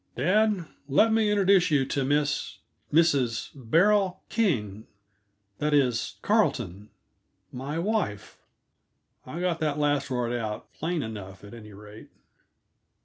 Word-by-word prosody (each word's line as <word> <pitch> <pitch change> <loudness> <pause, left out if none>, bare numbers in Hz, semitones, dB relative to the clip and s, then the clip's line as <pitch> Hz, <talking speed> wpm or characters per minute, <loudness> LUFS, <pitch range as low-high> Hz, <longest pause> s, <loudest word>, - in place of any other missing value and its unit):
"Dad, 195 - +2 0.2
let 220 +11 +4
me 220 -1 +2
introduce 195 -3 +4
you 140 -4 +2
to 140 +1 -1
Miss 145 +1 0 0.3
Mrs. 140 -8 +2
Beryl 180 - +2
King 110 - -1 0.7
that 150 0 +1
is, 125 -5 +1
Carleton; 120 - 0 0.6
my 135 +5 -5
wife." 170 - -2 0.9
I 150 +7 -6
got 175 -2 -1
that 150 -2 -1
last 145 -2 0
word 120 -2 -1
out 110 -3 -5
plain 165 -1 -2
enough, 100 -4 -8
at 105 - -12
any 105 -3 -11
rate. 105 +2 -13
145 Hz, 120 wpm, -26 LUFS, 115-180 Hz, 0.9 s, let